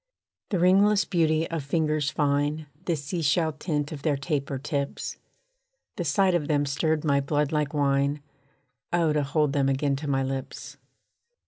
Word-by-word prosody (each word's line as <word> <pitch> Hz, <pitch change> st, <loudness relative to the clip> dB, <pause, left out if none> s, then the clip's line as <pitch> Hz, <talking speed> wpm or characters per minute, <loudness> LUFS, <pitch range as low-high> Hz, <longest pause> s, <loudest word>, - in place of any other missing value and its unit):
The 195 Hz, -, 0 dB
ringless 195 Hz, +3 st, +4 dB
beauty 160 Hz, -3 st, +1 dB
of 165 Hz, -3 st, -2 dB
fingers 150 Hz, 0 st, 0 dB
fine, 145 Hz, +1 st, 0 dB, 0.2 s
The 170 Hz, -, +1 dB
sea 150 Hz, +4 st, -4 dB
shell 160 Hz, +2 st, +2 dB
tint 150 Hz, -1 st, -2 dB
of 150 Hz, -3 st, -6 dB
their 145 Hz, -2 st, +1 dB
taper 140 Hz, -2 st, -2 dB
tips, 140 Hz, +1 st, -3 dB, 0.8 s
The 180 Hz, -, -3 dB
sight 180 Hz, +5 st, +2 dB
of 160 Hz, -4 st, 0 dB
them 145 Hz, -2 st, +1 dB
stirred 155 Hz, +3 st, 0 dB
my 140 Hz, -2 st, +3 dB
blood 145 Hz, +1 st, 0 dB
like 150 Hz, -2 st, 0 dB
wine, 140 Hz, 0 st, +1 dB, 0.7 s
Oh, 170 Hz, -3 st, +2 dB
to 150 Hz, -, +1 dB
hold 145 Hz, 0 st, +1 dB
them 140 Hz, -1 st, +2 dB
again 140 Hz, +1 st, +1 dB
to 150 Hz, +2 st, -6 dB
my 135 Hz, -1 st, +1 dB
lips! 135 Hz, 0 st, -5 dB
150 Hz, 160 wpm, -26 LUFS, 140-160 Hz, 0.8 s, ringless